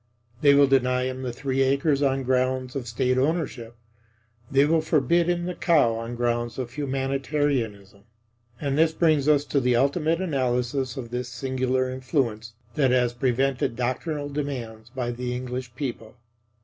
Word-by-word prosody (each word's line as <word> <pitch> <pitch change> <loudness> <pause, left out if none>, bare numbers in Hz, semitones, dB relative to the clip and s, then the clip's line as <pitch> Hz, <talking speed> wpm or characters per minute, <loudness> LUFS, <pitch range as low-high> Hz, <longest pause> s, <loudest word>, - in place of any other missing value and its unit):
They 140 -1 +6
will 140 0 +7
deny 125 -2 +2
him 130 0 -3
the 125 -2 -3
three 135 +2 -2
acres 140 +2 +2
on 135 -1 +1
grounds 130 0 0
of 130 -3 -4
State 125 +2 +1
Ownership. 135 -6 -2 0.7
They 135 +1 +4
will 160 +1 +3
forbid 165 +3 +2
him 175 0 0
the 180 - -3
cow 155 -9 +3
on 115 +1 -5
grounds 120 -1 -1
of 125 -2 -4
humanitarianism. 135 -7 -2 0.5
And 140 0 -1
this 160 0 +4
brings 155 -4 +2
us 145 -1 +4
to 140 - +1
the 125 -2 +2
ultimate 155 +6 +1
analysis 130 -5 -1
of 120 -3 -6
this 125 0 -3
singular 130 0 -1
influence 125 -4 -2 0.2
that 140 -4 +2
has 125 -1 +2
prevented 130 0 0
doctrinal 145 +5 -2
demands 125 -6 -5
by 120 -1 -3
the 125 +1 -4
English 125 -1 -5
people. 120 -6 -5
130 Hz, 155 wpm, -25 LUFS, 120-140 Hz, 0.7 s, will